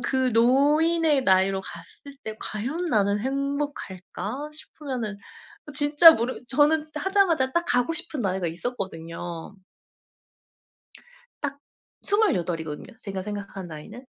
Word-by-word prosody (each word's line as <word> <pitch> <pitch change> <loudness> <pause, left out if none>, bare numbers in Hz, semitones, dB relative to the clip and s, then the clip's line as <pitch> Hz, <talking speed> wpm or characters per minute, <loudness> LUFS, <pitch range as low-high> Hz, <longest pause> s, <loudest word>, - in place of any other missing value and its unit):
'그 260 +1 +1
노인의 290 +5 +3
나이로 190 -1 +3
갔을 280 +7 -11
때 215 0 -5
과연 265 +12 -3
나는 205 -7 +2
행복할까' 275 -3 -4
싶으면은 260 -8 -5 0.6
진짜 295 +3 +8
모르 240 +2 -3
저는 300 +3 +3
하자마자 330 -5 +2
딱 340 +3 +1
가고 245 +6 +2
싶은 335 -4 0
나이가 190 -4 -1
있었거든요. 170 -2 -5 1.9
딱 280 -1 -3 0.4
28 185 - +1
이거든요, 150 +3 -7
제가 195 -2 -4
생각한 200 -2 -6
나이는. 210 - -10
255 Hz, 245 characters per minute, -25 LUFS, 195-295 Hz, 1.9 s, 진짜